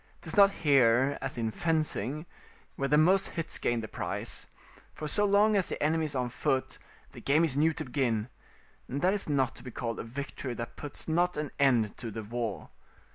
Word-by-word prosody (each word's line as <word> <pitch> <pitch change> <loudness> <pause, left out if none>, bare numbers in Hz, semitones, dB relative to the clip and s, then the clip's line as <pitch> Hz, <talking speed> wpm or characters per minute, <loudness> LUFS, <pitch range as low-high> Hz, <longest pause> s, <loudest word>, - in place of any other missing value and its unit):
'Tis - - -5
not 200 -1 +8
here, 135 -5 +3
as - - -4
in 115 -1 -1
fencing, 155 - -1 0.5
where 140 - -1
the 150 - +4
most 180 +5 +4
hits 165 -1 -3
gain 120 -1 0
the 110 - -5
prize; - - -4 0.5
for 155 - -5
so 205 +7 +2
long 205 +2 +4
as 195 -3 +1
the - - -3
enemy 160 +1 +2
is 150 - -4
on 125 -1 0
foot, 130 +2 -1 0.3
the - - -11
game 150 +4 +3
is 145 -5 -2
new 155 +3 +4
to 155 - -5
begin, 120 -5 0 0.6
and 140 +4 -4
that 185 +2 +4
is 205 -5 -3
not 135 -3 +1
to - - -11
be 130 - -7
called 115 -1 -4
a - - -3
victory 130 +1 -5
that 115 0 -6
puts 145 -1 -7
not 175 +2 +1
an 150 -2 -3
end 120 -7 +3
to 120 - -5
the 110 +1 -6
war. 115 -1 -4
140 Hz, 205 wpm, -30 LUFS, 120-160 Hz, 0.6 s, not